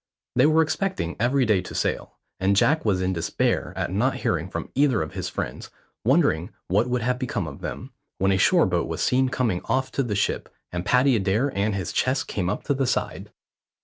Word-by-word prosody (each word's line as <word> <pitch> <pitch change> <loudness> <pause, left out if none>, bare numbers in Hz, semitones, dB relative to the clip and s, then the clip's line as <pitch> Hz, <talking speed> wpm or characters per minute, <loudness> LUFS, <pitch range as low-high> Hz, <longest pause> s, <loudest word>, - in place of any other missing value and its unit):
They - - +5
were 160 +1 +4
expecting 160 - -2
every 125 +3 +2
day 105 -5 +3
to - - -9
sail, - - -2 0.2
and 95 +1 +2
Jack 155 +10 +3
was 95 -4 +1
in 95 +1 0
despair 85 -2 -1
at - - -2
not - - +1
hearing - - -1
from - - -5
either 135 - +2
of 80 - -8
his - - -4
friends, - - -5 0.3
wondering 125 - +2 0.2
what 105 +7 +2
would 125 -2 0
have 125 +1 0
become 120 -7 -2
of 70 -3 -8
them, - - -6 0.3
when 95 +1 +2
a 95 - +3
shore 175 - +5
boat 85 -2 0
was 80 0 -2
seen 130 +1 +2
coming 120 -8 0
off 130 0 0
to - - 0
the 115 -6 -2
ship, 105 - -1 0.2
and 85 0 -4
Paddy 125 +1 +4
Adair 110 +7 0
and 100 +1 0
his 95 -4 -3
chest 130 +1 0
came 90 -3 -2
up 105 - -3
the 135 -2 0
side. - - -2
115 Hz, 210 wpm, -24 LUFS, 95-130 Hz, 0.3 s, They